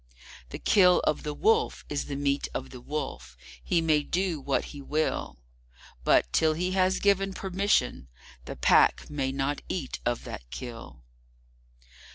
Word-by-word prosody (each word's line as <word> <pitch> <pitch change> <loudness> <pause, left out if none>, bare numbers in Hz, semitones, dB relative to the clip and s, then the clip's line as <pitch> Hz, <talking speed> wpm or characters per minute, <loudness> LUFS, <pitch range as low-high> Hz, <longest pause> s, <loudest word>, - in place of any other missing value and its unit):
The - - -6
Kill 180 -3 +5
of 155 - 0
the 150 -1 -4
Wolf 445 +1 +1
is 145 -1 -3
the 140 - -5
meat 140 0 0
of 130 - -4
the 125 - -10
Wolf. 120 - -5 0.3
He 170 - +1
may 155 -2 +3
do 175 +1 -1
what 135 0 0
he 145 - -8
will, 150 - -2 0.7
But, - - +3
till 160 -1 +3
he 180 +3 -1
has 185 0 +2
given 195 -1 +2
permission, 190 - 0 0.4
the - - -6
Pack - - +3
may 135 -2 -1
not 135 +1 -2
eat 155 -8 -4
of 120 -1 -1
that - - -7
Kill. 115 - -9
150 Hz, 155 wpm, -28 LUFS, 135-185 Hz, 0.7 s, Kill